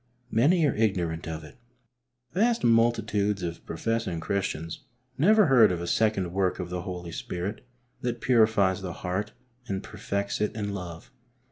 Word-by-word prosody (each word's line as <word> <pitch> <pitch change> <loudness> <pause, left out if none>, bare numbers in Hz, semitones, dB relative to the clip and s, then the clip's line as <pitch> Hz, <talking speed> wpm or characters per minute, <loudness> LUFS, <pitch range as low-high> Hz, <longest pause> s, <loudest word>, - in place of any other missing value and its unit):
Many 155 +9 +4
are 145 - +2
ignorant 90 -7 0
of 80 -1 -5
it. 75 - -13 0.8
Vast 230 +6 +2
multitudes 110 -4 +2
of 85 -1 -4
professing 95 0 -2
Christians 85 -2 -2 0.4
never 205 - +5
heard 120 - +6
of 90 - -2
a 85 - -4
second 100 -3 +1
work 95 -1 +1
of 90 -1 -5
the 90 -1 -2
Holy 90 -2 -6
Spirit 90 +7 -4 0.4
that 120 -1 -2
purifies 110 -5 +3
the 90 -2 -5
heart 95 +5 -3 0.3
and 95 -3 -3
perfects 100 +1 -3
it 105 - 0
in 100 -2 -3
love. 85 -4 -7
100 Hz, 150 wpm, -27 LUFS, 90-115 Hz, 0.8 s, heard